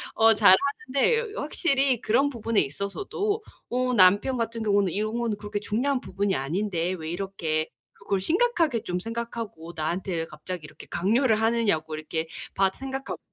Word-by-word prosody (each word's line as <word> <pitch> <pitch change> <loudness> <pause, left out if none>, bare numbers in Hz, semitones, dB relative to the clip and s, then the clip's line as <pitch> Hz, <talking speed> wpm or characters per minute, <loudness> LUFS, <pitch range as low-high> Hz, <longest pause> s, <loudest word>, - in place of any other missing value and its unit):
어 225 0 +6
잘하는데 280 - +3
확실히 275 - +2
그런 265 +6 +2
부분에 230 -4 0
있어서도 400 - -2 0.3
어 250 +1 0
남편 205 +5 +5
같은 230 0 -2
경우는 200 -3 +2
'이런 215 +3 -1
거는 230 -3 -1
그렇게 205 0 -4
중요한 250 +7 0
부분이 195 -2 -1
아닌데 175 +4 -1
왜 160 -3 -6
이렇게 170 -4 -2 0.3
그걸 195 -1 -2
심각하게 330 - +1
쫌 180 0 -2
생각하고 230 -6 -5
나한테 165 +1 -2
갑자기 160 +1 -7
이렇게 - - -12
강요를 220 +4 +2
하느냐.'고 210 -9 +1
이렇게 160 +1 -3 0.3
밧 190 -1 +2
생각하고 270 0 -5
210 Hz, 360 characters per minute, -26 LUFS, 180-255 Hz, 0.3 s, 어